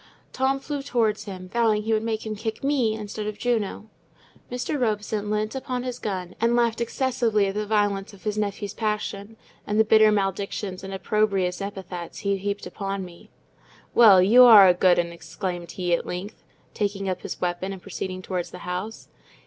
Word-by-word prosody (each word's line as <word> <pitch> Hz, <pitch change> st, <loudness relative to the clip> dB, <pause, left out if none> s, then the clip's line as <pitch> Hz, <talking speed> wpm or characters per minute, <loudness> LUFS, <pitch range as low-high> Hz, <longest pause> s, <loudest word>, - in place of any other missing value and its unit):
Tom 270 Hz, +1 st, +1 dB
flew 285 Hz, +1 st, -4 dB
towards 225 Hz, -6 st, 0 dB
him, 185 Hz, -3 st, -8 dB
vowing 215 Hz, 0 st, +1 dB
he 220 Hz, +1 st, 0 dB
would 215 Hz, -, +2 dB
make 225 Hz, -1 st, -3 dB
him 215 Hz, -1 st, -3 dB
kick 220 Hz, +2 st, -5 dB
me 265 Hz, -6 st, +1 dB
instead 210 Hz, 0 st, -5 dB
of 210 Hz, -1 st, -4 dB
Juno. 220 Hz, -3 st, -1 dB, 0.6 s
Mr. 250 Hz, +3 st, -2 dB
Robson 210 Hz, -2 st, -1 dB
leant 215 Hz, +1 st, -1 dB
upon 255 Hz, -2 st, -3 dB
his 250 Hz, -1 st, -5 dB
gun, 185 Hz, -3 st, -4 dB
and 235 Hz, +1 st, +3 dB
laughed 235 Hz, -1 st, +1 dB
excessively 235 Hz, -4 st, +1 dB
at 195 Hz, -, -2 dB
the 210 Hz, 0 st, -3 dB
violence 205 Hz, -2 st, 0 dB
of 200 Hz, -2 st, -16 dB
his 210 Hz, -1 st, -1 dB
nephew's 205 Hz, -1 st, -3 dB
passion, 210 Hz, -1 st, -3 dB, 0.3 s
and 210 Hz, +1 st, 0 dB
the -, -, +7 dB
bitter 215 Hz, 0 st, +6 dB
maledictions 195 Hz, -1 st, -2 dB
and 195 Hz, -, -6 dB
opprobrious 195 Hz, -2 st, 0 dB
epithets 190 Hz, -3 st, -6 dB
he 200 Hz, -1 st, +1 dB
heaped 200 Hz, +1 st, -3 dB
upon 195 Hz, -2 st, -4 dB
me. 170 Hz, -1 st, -14 dB, 0.6 s
"Well, 200 Hz, -6 st, +8 dB
you 235 Hz, +6 st, +7 dB
are 215 Hz, -6 st, +10 dB
a 180 Hz, -, +6 dB
good 180 Hz, 0 st, +4 dB
'un!" 170 Hz, 0 st, 0 dB
exclaimed 175 Hz, 0 st, -6 dB
he, 180 Hz, -2 st, -1 dB
at 170 Hz, -, 0 dB
length, 190 Hz, +4 st, -6 dB, 0.3 s
taking 200 Hz, -2 st, -2 dB
up 185 Hz, -1 st, -2 dB
his -, -, -6 dB
weapon 180 Hz, +2 st, -2 dB
and 195 Hz, -, -7 dB
proceeding 185 Hz, 0 st, -6 dB
towards 180 Hz, -2 st, -3 dB
the 180 Hz, -, -10 dB
house. 180 Hz, +5 st, -5 dB
210 Hz, 185 wpm, -25 LUFS, 190-220 Hz, 0.6 s, are